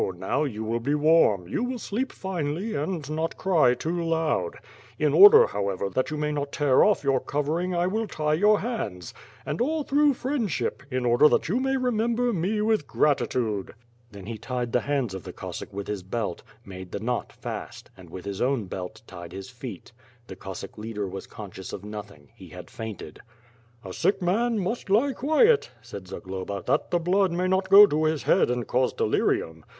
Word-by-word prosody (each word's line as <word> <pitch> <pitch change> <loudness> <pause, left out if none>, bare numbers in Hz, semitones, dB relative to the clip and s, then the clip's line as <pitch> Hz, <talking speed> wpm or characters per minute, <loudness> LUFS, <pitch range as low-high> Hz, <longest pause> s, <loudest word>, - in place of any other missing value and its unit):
now, 95 - -1
you 110 -7 -3
will 115 +2 -1
be 140 +5 0
warm; 150 - +3
you 160 - -2
will 250 0 -2
sleep 240 +4 -3
finely, 180 +2 -3
and 155 0 -3
not 160 +2 -3
cry 155 -10 +3
too 170 +6 -2
loud. 165 -1 0 0.4
In - - +1
order, 425 +4 +9
however, 100 0 -2
that 130 +6 0
you 155 - -4
may 150 0 -1
not 145 -1 -3
tear 145 -4 +3
off 210 -6 +3
your 135 -2 +2
covering 160 +7 -2
I 175 0 +1
will 220 +4 -1
tie 150 -4 -1
your 205 +6 +4
hands, 105 - -4 0.3
and - - -3
all 305 +4 0
through 285 0 +3
friendship, 230 - -2
in 130 -2 -2
order 120 +5 +5
that - - +1
you 225 +7 +1
may 270 +1 0
remember 240 -1 0
me 200 +4 0
with 215 -8 +1
gratitude." 120 -8 0 0.4
Then 100 -2 -10
he 110 0 -6
tied 125 0 -3
the 125 - +3
hands 135 -6 -1
of 95 -3 -6
the - - -7
Cossack - - -7
with 100 0 -5
his 105 -2 -4
belt, 95 -1 -4 0.2
made 95 -1 -9
the - - -4
knc>t 120 +3 -3
fast; - - -7
and, 90 -3 -14
with 90 +2 -9
his 100 0 -5
own 130 -4 +1
belt, 95 +4 -7
tied 85 -4 -10
his 95 +6 -8
feet. 120 -5 -9 0.3
The - - -9
Cos 95 -2 -8
sack - - -10
leader 105 -2 -4
was 95 +1 -7
conscious 95 -3 -9
of 100 - -7
nothing; 105 -8 -9
he - - -13
had - - -11
fainted. 110 -8 -8 0.7
•*A 95 - -7
sick 195 - +1
man 220 +6 +1
must 205 +3 -3
lie 245 +8 +3
quiet," 315 - +3
said 100 -6 -9
Zagloba, 95 +1 -6
"that - - 0
the 175 - +2
blood 185 +2 +2
may 180 +2 0
not 190 0 +1
go 200 +2 +10
to 155 -4 0
his 155 -2 0
head - - +3
and 125 -1 -1
cause 130 +1 +1
delirium. 80 0 0
145 Hz, 195 wpm, -26 LUFS, -, 0.7 s, go